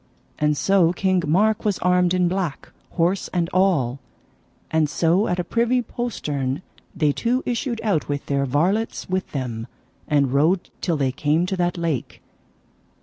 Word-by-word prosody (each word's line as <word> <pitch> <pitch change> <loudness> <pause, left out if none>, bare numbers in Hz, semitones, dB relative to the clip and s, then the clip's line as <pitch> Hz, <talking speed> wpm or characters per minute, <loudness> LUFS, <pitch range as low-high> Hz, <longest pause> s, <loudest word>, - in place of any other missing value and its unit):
And 150 -1 +2
so 190 -2 +3
King 185 0 +1
Mark 210 +7 +2
was 205 -3 +1
armed 180 0 +2
in 180 -1 +2
black, 175 -5 -3 0.2
horse 175 +3 +1
and 175 -2 -1
all; 160 -10 +2 0.7
and 160 -2 +2
so 170 +7 +2
at 180 - 0
a 180 - -1
privy 235 +5 +1
postern 150 - -3 0.3
they 150 -2 +2
two 245 - 0
issued 240 -1 -2
out 200 -10 0
with 145 -1 -2
their 140 -1 0
varlets 185 - 0
with 185 0 -2
them, 120 -4 -4 0.4
and 140 -3 +2
rode 165 +6 +2
till 170 -4 0
they 135 -2 +1
came 150 +5 +1
to 190 +1 -2
that 175 0 0
lake. 165 -7 -3
175 Hz, 155 wpm, -22 LUFS, 145-195 Hz, 0.7 s, so